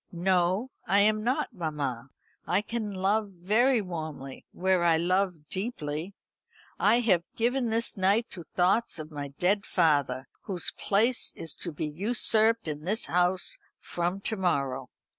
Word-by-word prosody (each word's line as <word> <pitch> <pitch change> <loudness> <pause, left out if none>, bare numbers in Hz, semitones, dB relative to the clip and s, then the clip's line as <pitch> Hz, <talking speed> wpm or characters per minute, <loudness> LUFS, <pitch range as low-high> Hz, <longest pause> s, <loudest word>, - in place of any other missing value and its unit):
"No, 185 +6 +1 0.2
I 200 +3 +4
am 215 +1 +2
not, 250 +1 -1
mamma; 145 - -4 0.4
I 195 +4 +1
can 225 -1 -4
love 200 +2 0
very 215 +7 +2
warmly, 155 -7 -7
where 185 -1 +1
I 165 -2 +4
love 180 -2 0
deeply. 185 -3 -4 0.6
I 215 +6 +4
have 190 -8 +3
given 245 +1 0
this 230 +1 +1
night 200 +4 +2
to 180 - -6
thoughts 180 +8 +1
of 155 0 -7
my 145 -1 -5
dead 180 +9 0
father, 145 -8 +1 0.2
whose 180 -4 0
place 225 +5 +2
is 165 - -3
to 170 - 0
be 150 - -4
usurped 220 +6 +2
in 150 -1 -4
this 210 +6 0
house 180 +1 +1 0.2
from 175 +3 -3
to 220 - +1
morrow." 140 -8 -1
185 Hz, 145 wpm, -28 LUFS, 160-215 Hz, 0.6 s, I